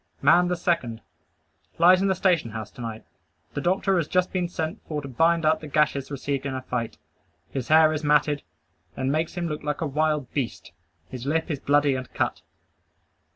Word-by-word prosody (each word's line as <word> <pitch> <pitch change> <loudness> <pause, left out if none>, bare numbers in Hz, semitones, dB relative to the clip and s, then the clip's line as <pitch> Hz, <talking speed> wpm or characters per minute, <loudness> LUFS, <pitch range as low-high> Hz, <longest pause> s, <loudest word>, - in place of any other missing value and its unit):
Man 175 +5 +5
the 180 - 0
second. 130 -10 -1 0.8
Lies 180 +2 +6
in 195 - +2
the 190 - +2
station 175 -8 +2
house 110 -1 -6
to - - -11
night. 115 -1 -6 0.5
The - - -3
doctor 190 +2 +1
has 165 -3 0
just 180 +1 +1
been 180 -2 -1
sent 165 +3 -4
for 150 -2 -2
to 140 - -7
bind 165 +5 +2
up 155 +1 +3
the 155 - -9
gashes 145 -2 +1
received 140 0 -3
in 135 - -3
a 130 - -3
fight. 120 -3 -3 0.5
His 130 -3 -4
hair 155 0 +6
is 155 0 -3
matted, 150 0 +2 0.6
and 130 +1 0
makes 160 +4 -1
him 175 -1 -2
look 150 -2 -4
like 150 +1 -3
a - - 0
wild 150 -2 0
beast. 135 -5 -3 0.4
His 130 0 -7
lip 160 +3 0
is 145 - -2
bloody 145 0 +3
and 130 -1 -5
cut. - - -1
150 Hz, 200 wpm, -25 LUFS, 135-170 Hz, 0.8 s, Lies